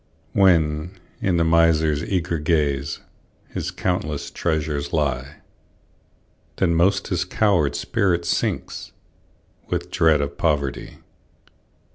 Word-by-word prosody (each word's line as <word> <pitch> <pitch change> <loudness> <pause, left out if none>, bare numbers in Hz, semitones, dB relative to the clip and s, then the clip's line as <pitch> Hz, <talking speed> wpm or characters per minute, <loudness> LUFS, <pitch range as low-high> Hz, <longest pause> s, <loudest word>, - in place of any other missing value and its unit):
When, 85 -2 +2 0.2
in 90 -3 +1
the 85 - +3
miser's 80 -2 +3
eager 85 -3 -1
gaze, 75 -3 0 0.5
His - - -4
countless 75 -5 -2
treasures 75 -3 -2
lie, 70 -2 -1 1.2
Then 85 -3 +1
most 95 +4 +2
his 90 -2 0
coward 90 - +1
spirit 85 -3 0
sinks, - - -2 0.8
With - - -3
dread 80 -2 +4
of 70 0 -4
poverty. 75 -4 -1
80 Hz, 100 wpm, -22 LUFS, 75-90 Hz, 1.2 s, dread